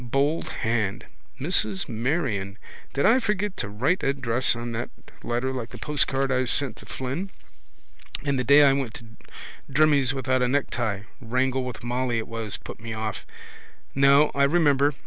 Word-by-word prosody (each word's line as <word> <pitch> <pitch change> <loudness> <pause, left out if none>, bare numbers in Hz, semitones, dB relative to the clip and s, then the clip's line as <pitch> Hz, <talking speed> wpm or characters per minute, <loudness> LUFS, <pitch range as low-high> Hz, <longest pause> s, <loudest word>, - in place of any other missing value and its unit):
Bold 140 +6 0
hand: 110 -1 -1 0.3
Mrs 185 +5 0
Marion. 115 - -2 0.3
Did 140 - 0
I 245 +4 +6
forget 210 -4 -1
to - - -3
write 130 - 0
address 130 -3 +1
on 120 0 -5
that 115 +1 -4 0.3
letter 120 +2 -2
like 120 -3 -4
the 120 - -10
postcard 135 0 0
I 130 0 +2
sent 130 -1 +2
to - - -14
Flynn? 135 +10 -4 1.0
And 140 -2 +1
the - - 0
day 140 +3 +7
I 140 -1 +6
went 135 -5 -2
to 120 - -9 0.7
Drimmie's 145 -2 +4
without 130 -1 0
a 125 - +3
necktie. 120 -6 -1 0.2
Wrangle 130 +2 0
with 125 -3 -7
Molly 120 0 -1
it 110 - -3
was 115 -2 -5
put - - -10
me 115 0 -6
off. 110 -1 -4 0.7
No, 140 +2 +5
I 140 0 +3
remember. 145 -2 +3
130 Hz, 165 wpm, -25 LUFS, 115-140 Hz, 1.0 s, day